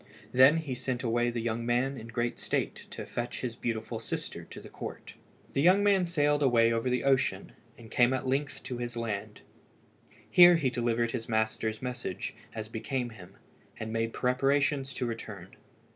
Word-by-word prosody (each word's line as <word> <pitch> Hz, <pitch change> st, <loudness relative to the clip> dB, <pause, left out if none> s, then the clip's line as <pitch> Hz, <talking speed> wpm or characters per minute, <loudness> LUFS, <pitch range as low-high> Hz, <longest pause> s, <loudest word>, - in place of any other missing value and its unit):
Then 130 Hz, +5 st, +7 dB
he 155 Hz, -5 st, -3 dB
sent 125 Hz, 0 st, -3 dB
away 120 Hz, 0 st, +1 dB
the 120 Hz, -1 st, -3 dB
young 115 Hz, 0 st, -1 dB
man 125 Hz, +3 st, +1 dB
in 115 Hz, -3 st, -8 dB
great 120 Hz, +1 st, -2 dB
state -, -, -2 dB
to -, -, -7 dB
fetch 120 Hz, 0 st, -4 dB
his 120 Hz, -3 st, -3 dB
beautiful 115 Hz, -2 st, -3 dB
sister -, -, -4 dB
to -, -, -10 dB
the -, -, -11 dB
court. -, -, -8 dB, 0.4 s
The 140 Hz, -, +1 dB
young 185 Hz, +5 st, +5 dB
man 195 Hz, -3 st, +4 dB
sailed 145 Hz, -3 st, +2 dB
away 115 Hz, -4 st, +4 dB
over 115 Hz, +2 st, 0 dB
the 125 Hz, 0 st, 0 dB
ocean, 135 Hz, -2 st, +1 dB, 0.3 s
and 115 Hz, -2 st, -13 dB
came 120 Hz, 0 st, +4 dB
at 130 Hz, -1 st, -1 dB
length 140 Hz, +2 st, -1 dB
to 125 Hz, -2 st, -5 dB
his 120 Hz, -1 st, -4 dB
land. 110 Hz, -4 st, -4 dB, 0.9 s
Here 175 Hz, +9 st, +8 dB
he 140 Hz, -6 st, +1 dB
delivered 120 Hz, -1 st, 0 dB
his 115 Hz, -2 st, -4 dB
master's 110 Hz, 0 st, -1 dB
message, 125 Hz, -7 st, -4 dB, 0.2 s
as 110 Hz, -1 st, -4 dB
became 120 Hz, +3 st, -3 dB
him, 95 Hz, -5 st, -13 dB, 0.4 s
and 110 Hz, 0 st, -4 dB
made 115 Hz, 0 st, 0 dB
preparations 135 Hz, +2 st, +1 dB
to 125 Hz, -, -1 dB
return. 105 Hz, -5 st, -7 dB
120 Hz, 175 wpm, -30 LUFS, 115-135 Hz, 0.9 s, Here